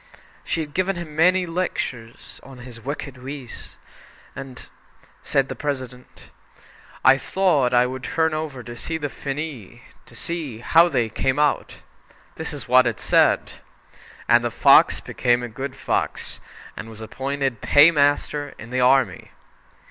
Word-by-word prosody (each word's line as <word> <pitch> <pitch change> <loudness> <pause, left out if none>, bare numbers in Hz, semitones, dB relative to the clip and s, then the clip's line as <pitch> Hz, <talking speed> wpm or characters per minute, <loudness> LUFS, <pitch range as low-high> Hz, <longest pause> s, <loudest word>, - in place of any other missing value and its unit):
She 165 - -2
had 150 -2 -7
given 185 +3 0
him 170 -3 -7
many 180 +3 +4
lectures 150 -9 -4
on 135 -1 -13
his 120 -2 -10
wicked 135 0 -6
ways, 135 -1 -8 0.6
and 135 -2 -9 0.5
said 135 -1 +1
the - - -6
President: 130 -4 -6 0.7
"I 130 +1 +7
thought 150 -6 +1
I 125 0 +4
would 130 0 -5
turn 160 +2 0
over 155 -5 -4
to 120 - -8 0.2
the 145 -2 -4
finis, 140 -7 -6 0.3
and - - -14
see 160 -9 -4
how 165 +9 +4
they 125 -7 +1
came 130 +4 -1
out. 150 -1 +1 0.6
This 160 - -5
is 145 -7 -7
what 125 0 +5
it 115 - -2
said: - - +3 0.8
"'And - - +5
the - - 0
fox - - +5
became 120 -1 0
a - - -3
good 130 +4 -6
fox, - - -3 0.4
and 115 - -8
was 110 0 -11
appointed 135 +1 -3
paymaster 145 -1 +3
in 115 +2 -11
the 125 0 0
army.' 125 -7 +2
135 Hz, 145 wpm, -22 LUFS, 125-150 Hz, 0.8 s, I